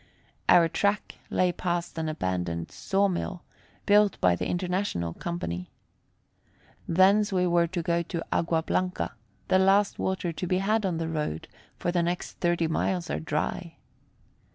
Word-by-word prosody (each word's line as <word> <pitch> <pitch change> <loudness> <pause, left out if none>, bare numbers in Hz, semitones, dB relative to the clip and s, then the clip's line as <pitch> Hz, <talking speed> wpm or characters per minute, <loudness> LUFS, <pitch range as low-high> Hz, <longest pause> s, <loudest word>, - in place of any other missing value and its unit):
Our 170 -1 +7
track 200 +5 -1
lay 180 -1 +2
past 175 -1 -2
an 160 -1 -1
abandoned 90 - -2
saw 195 +1 +1
mill, 180 -1 -3 0.4
built 205 0 +4
by 90 -1 +4
the - - -3
International 180 - -1
Company. 90 - -4 1.2
Thence 195 +4 +4
we 180 -1 +2
were 170 -1 +3
to 175 0 -3
go 170 0 +1
to 170 0 -4
Agua 165 -1 +1
Blanca, 185 +2 -1 0.4
the 185 - +5
last 195 +2 +3
water 190 -2 -1
to 180 - -4
be 185 - +1
had 210 +2 +1
on 175 -3 -1
the 165 0 -2
road; 150 - -3 0.3
for 175 - -1
the 175 -1 +1
next 175 +1 -3
thirty 175 -1 +1
miles 170 +2 -1
are - - -1
dry. 160 +2 -3
175 Hz, 155 wpm, -27 LUFS, 160-185 Hz, 1.2 s, Our